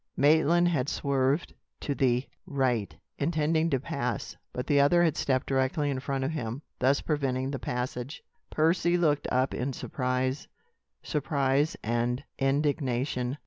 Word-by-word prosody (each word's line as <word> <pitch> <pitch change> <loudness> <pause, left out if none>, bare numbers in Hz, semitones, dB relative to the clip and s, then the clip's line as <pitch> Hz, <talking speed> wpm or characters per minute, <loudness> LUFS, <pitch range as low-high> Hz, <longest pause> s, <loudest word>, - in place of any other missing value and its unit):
Maitland 160 +4 +4
had 145 -5 0
swerved 140 +2 0 0.3
to 145 - -1
the 125 -1 +1 0.2
right, 130 - 0 0.2
intending 160 +1 +1
to 135 - +1
pass; 135 -4 -3 0.2
but 125 - -4
the 145 -1 +3
other 175 +5 +5
had 160 -3 +2
stepped 130 -2 0
directly 135 +2 0
in 130 - -2
front 135 0 -2
of 135 - -1
him, 130 -2 -4 0.2
thus 135 +2 +3
preventing 135 -3 -1
the 135 - -3
passage. 125 +3 -4 0.3
Percy 170 +2 +2
looked 150 -4 +1
up 130 +1 +1
in 135 +2 -2
surprise 130 +1 -2 0.6
surprise 140 0 0
and 120 +3 0 0.2
indignation. 135 -2 0
135 Hz, 140 wpm, -28 LUFS, 130-150 Hz, 0.6 s, other